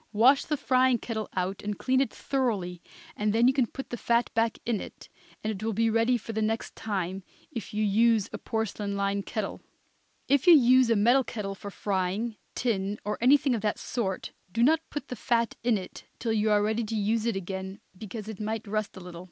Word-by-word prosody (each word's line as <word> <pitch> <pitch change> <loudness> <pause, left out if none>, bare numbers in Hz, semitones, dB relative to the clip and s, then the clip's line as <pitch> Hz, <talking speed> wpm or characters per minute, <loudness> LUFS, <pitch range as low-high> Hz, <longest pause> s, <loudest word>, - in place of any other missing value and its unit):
Wash 260 +6 +5
the 300 - -1
frying 255 -2 +3
kettle 220 -2 -4
out 185 +1 -2
and 205 -1 -3
clean 260 0 +2
it 275 - 0
thoroughly, 205 -10 -2 0.3
and 210 0 0
then 230 +2 +4
you 260 - +5
can 260 -3 +2
put 270 - -8
the 240 - -3
fat 235 +1 +1
back 225 0 +1
in 230 -3 0
it, - - -11 0.3
and 215 - 0
it 195 - -8
will 225 0 -1
be 225 +2 +2
ready 230 +2 +3
for 225 0 -7
the 220 - -1
next 220 +1 -2
time, 190 -3 -3 0.3
if 235 -6 -6
you 210 +1 -1
use 220 +1 +3
a - - -4
porcelain 210 -3 -3
lined 200 0 -1
kettle; 215 -4 -3 0.7
if 280 +1 +2
you 345 - +10
use 255 -2 +6
a 230 - +4
metal 240 +6 +4
kettle 210 -5 -4
for 200 +1 -8
frying, 200 +3 -2 0.2
tin 205 -4 -1
or 210 0 -2
anything 270 +1 +5
of 225 - -1
that 210 0 0
sort, 195 -6 -3 0.2
do 230 +4 +1
not 315 +5 +5
put 290 -2 -5
the 250 - -4
fat 235 0 0
in 235 -2 +3
it 185 -2 -9
till 230 -2 -1
you 215 0 +2
are 205 -1 +4
ready 220 +2 0
to 220 +1 -3
use 215 +2 +1
it 230 - 0
again, 190 +1 -5 0.2
because 215 +2 -7
it 220 -3 -7
might 220 +1 -3
rust 210 -1 -2
it - - -8
a - - -11
little. 175 -2 -8
220 Hz, 220 wpm, -28 LUFS, 200-240 Hz, 0.7 s, you